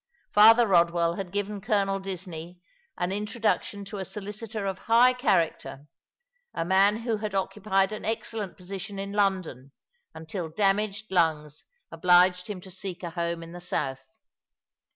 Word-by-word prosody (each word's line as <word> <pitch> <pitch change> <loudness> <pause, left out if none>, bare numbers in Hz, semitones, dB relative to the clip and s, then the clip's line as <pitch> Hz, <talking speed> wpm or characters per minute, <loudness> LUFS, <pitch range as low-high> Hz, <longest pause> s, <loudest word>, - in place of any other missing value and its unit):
Father 225 +3 +7
Eodwell 170 -2 +3
had 185 -2 -5
given 205 0 -3
Colonel 200 -2 +1
Disney 180 -3 -7 0.4
an 175 +1 -1
introduction 210 -1 -1
to 200 +1 -7
a - - -2
solicitor 210 +2 -6
of 190 -1 -3
high 245 +3 +6
character, 165 - 0 0.7
a 165 - -1
man 195 +3 +4
who 230 -2 -1
had 210 -1 -4
occupied 195 0 0
an 215 - -6
excellent 220 -3 -3
position 195 +2 -7
in 200 0 -4
London 185 -10 -1 0.4
until 160 +1 -5
damaged 205 +4 0
lungs 155 -4 0 0.3
obliged 180 0 +4
him 200 -3 -4
to 190 - -12
seek 185 0 -7
a 170 - -4
home 170 0 -3
in 165 - -10
the 175 - -8
south. 135 -6 -2
195 Hz, 145 wpm, -27 LUFS, 175-210 Hz, 0.7 s, Father